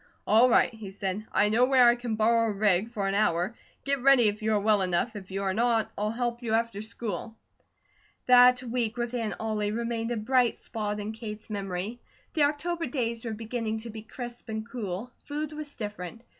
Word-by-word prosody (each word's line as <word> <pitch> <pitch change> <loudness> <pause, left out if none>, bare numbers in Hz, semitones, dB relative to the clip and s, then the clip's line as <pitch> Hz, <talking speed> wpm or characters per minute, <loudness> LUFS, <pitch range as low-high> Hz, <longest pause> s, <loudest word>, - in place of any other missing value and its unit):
"All 230 +4 +6
right," 245 - +4
he 220 -3 -8
said. 195 +2 -4
"I 210 - +3
know 225 +4 +3
where 255 -1 +6
I 240 - +6
can 240 -2 -3
borrow 230 +1 +3
a - - 0
rig 200 0 +2
for 205 -4 -2
an 195 - 0
hour. 200 0 +1 0.3
Get 280 -1 0
ready 265 -3 +6
if 210 +2 -6
you 220 0 0
are 210 - +3
well 210 0 +3
enough, 185 +5 0
if 195 -3 -8
you 195 +1 -3
are 190 -1 0
not, 230 +1 +1
I'll 210 +1 -1
help 240 +1 -2
you 225 -2 -2
after 230 -3 -1
school." 220 -1 -5 0.9
That 250 0 +7
week 235 -2 -2
with 240 0 -2
Aunt 225 -6 -2
Ollie 215 -2 -1
remained 230 0 -2
a 240 - -1
bright 245 +2 +2
spot 210 -1 -4
in 210 +1 -4
Kate's 220 -1 -7
memory. 200 +3 -4 0.3
The 300 -2 +4
October 330 +3 -1
days 235 -3 -2
were 225 - -3
beginning 225 0 -3
to 230 0 -7
be 220 0 -8
crisp 240 +2 -8
and 220 0 -4
cool. 225 -1 -5
Food 300 +1 -4
was 300 -1 -7
different. 210 0 -6
225 Hz, 205 wpm, -28 LUFS, 210-245 Hz, 0.9 s, That